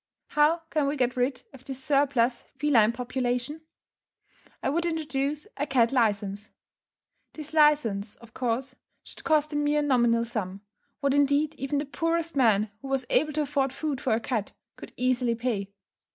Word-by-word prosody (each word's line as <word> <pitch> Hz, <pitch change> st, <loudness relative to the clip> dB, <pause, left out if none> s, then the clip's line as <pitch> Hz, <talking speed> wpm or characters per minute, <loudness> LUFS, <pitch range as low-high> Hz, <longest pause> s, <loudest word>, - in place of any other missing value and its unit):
How 310 Hz, +3 st, +3 dB
can 300 Hz, -3 st, +1 dB
we 290 Hz, +1 st, -1 dB
get 250 Hz, 0 st, +1 dB
rid 250 Hz, +1 st, -1 dB
of 265 Hz, -1 st, -14 dB
this 265 Hz, -1 st, -6 dB
surplus 265 Hz, -4 st, +2 dB
feline 255 Hz, -6 st, +4 dB
population? 250 Hz, +4 st, -2 dB, 1.0 s
I 270 Hz, -, +1 dB
would 340 Hz, +3 st, 0 dB
introduce 300 Hz, -2 st, -2 dB
a 290 Hz, +1 st, -1 dB
cat 245 Hz, -4 st, +3 dB
licence. 210 Hz, -4 st, 0 dB, 0.8 s
This 310 Hz, 0 st, -8 dB
licence, 290 Hz, -10 st, +3 dB
of 235 Hz, -1 st, -17 dB
course, 255 Hz, +1 st, -2 dB, 0.3 s
should -, -, -12 dB
cost 305 Hz, -1 st, +2 dB
a -, -, -3 dB
mere 295 Hz, 0 st, +2 dB
nominal 240 Hz, -4 st, +3 dB
sum, 200 Hz, -4 st, -4 dB, 0.4 s
what 280 Hz, -1 st, +2 dB
indeed 285 Hz, +2 st, +2 dB
even 275 Hz, 0 st, -3 dB
the 290 Hz, -, -1 dB
poorest 330 Hz, +2 st, -1 dB
man 220 Hz, -5 st, +3 dB
who 275 Hz, -, -8 dB
was 270 Hz, -1 st, -1 dB
able 305 Hz, 0 st, +2 dB
to 305 Hz, +1 st, +1 dB
afford 275 Hz, -2 st, 0 dB
food 290 Hz, -2 st, -3 dB
for 250 Hz, -, +1 dB
a -, -, 0 dB
cat, 220 Hz, -3 st, -3 dB, 0.2 s
could -, -, -11 dB
easily 250 Hz, -1 st, +1 dB
pay. 225 Hz, -5 st, -2 dB
270 Hz, 165 wpm, -27 LUFS, 235-295 Hz, 1.0 s, feline